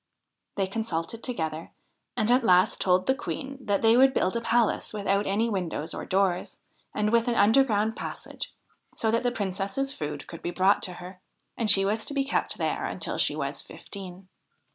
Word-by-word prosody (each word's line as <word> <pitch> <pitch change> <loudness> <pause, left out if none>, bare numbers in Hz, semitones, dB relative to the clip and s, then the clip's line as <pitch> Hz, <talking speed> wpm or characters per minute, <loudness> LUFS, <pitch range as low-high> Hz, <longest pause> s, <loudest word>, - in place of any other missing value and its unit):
They 195 - +1
consulted 195 0 -3
together, 160 -9 -3 0.5
and 215 +2 +2
at 250 +1 +4
last 180 -4 +4
told 185 0 +3
the 265 - +3
Queen 275 0 -6
that 200 -2 0
they 225 +1 +6
would 265 +2 +5
build 185 - +1
a 235 - 0
palace 230 -1 +1
without 200 -1 0
any 210 +4 +1
windows 180 -7 -3
or - - -5
doors, 190 -2 0 0.3
and 210 0 0
with 235 +1 +3
an 240 - +1
underground 220 -1 +3
passage, - - -6 0.4
so 220 - +1
that 230 - +2
the 245 -1 0
Princess's 200 +6 -2
food 150 - -5
could 165 - -10
be - - -3
brought 190 +3 +3
to 180 - -3
her. 180 +1 -10 0.3
And 225 -2 -1
she 195 -1 +6
was 215 +2 0
to 290 - -4
be 275 - +2
kept 275 - -1
there - - -1
until - - -3
she - - +2
was - - -1
fifteen. 190 -2 -10
205 Hz, 185 wpm, -27 LUFS, 185-230 Hz, 0.5 s, they